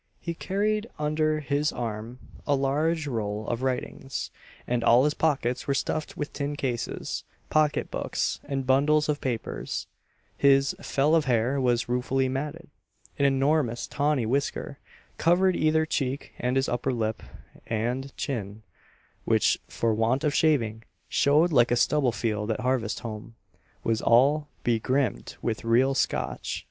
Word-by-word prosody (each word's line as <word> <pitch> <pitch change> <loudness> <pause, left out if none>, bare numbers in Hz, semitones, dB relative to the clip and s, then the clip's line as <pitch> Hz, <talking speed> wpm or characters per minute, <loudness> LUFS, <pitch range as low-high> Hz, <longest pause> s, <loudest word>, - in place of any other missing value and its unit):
He 170 - -4
carried 210 +5 -1
under 155 0 0
his 145 +1 0
arm 115 0 -5 0.3
a 145 - +3
large 150 +4 0
roll 110 -5 -3
of 120 0 -2
writings, 130 +1 -3 0.3
and 120 -1 -1
all 120 +2 +6
his 150 0 +2
pockets 130 -6 0
were 140 - +1
stuffed 155 +2 -2
with 145 - -4
tin 145 0 -3
cases, 125 -5 -3 0.3
pocket 155 -1 +2
books, - - -2
and 135 -1 -3
bundles 145 +3 +3
of 150 -1 0
papers: 120 -4 -3 0.5
his 135 -1 +4
"fell 145 +3 +1
of 160 -2 +4
hair" 125 +2 +1
was 120 -2 +1
ruefully 130 +2 0
matted; 150 +5 -4 0.5
an 140 - +3
enormous 135 -2 +2
tawny 145 -4 0
whisker 140 +2 -2 0.4
covered 180 +2 +3
either 160 0 +2
cheek 140 -3 -2
and 125 +1 0
his 135 +1 +2
upper 125 +2 -1
lip 110 -3 -2 0.5
and 120 +5 -2
chin, 110 -6 -4 0.6
which, - - +2
for 115 -1 0
want 115 +5 +1
of 150 -2 +1
shaving, 115 -9 +2 0.3
"showed 155 +5 +3
like 120 -5 +5
a 120 - +3
stubble 135 +1 +2
field 105 -2 -2
at 110 - -1
harvest 125 -3 -1
home," 115 -1 -7 0.5
was 115 -1 0
all 140 +6 +4 0.2
begrimed 120 - 0
with 110 0 -2
real 120 +4 +3
Scotch. 135 - -1
135 Hz, 145 wpm, -27 LUFS, 120-150 Hz, 0.6 s, all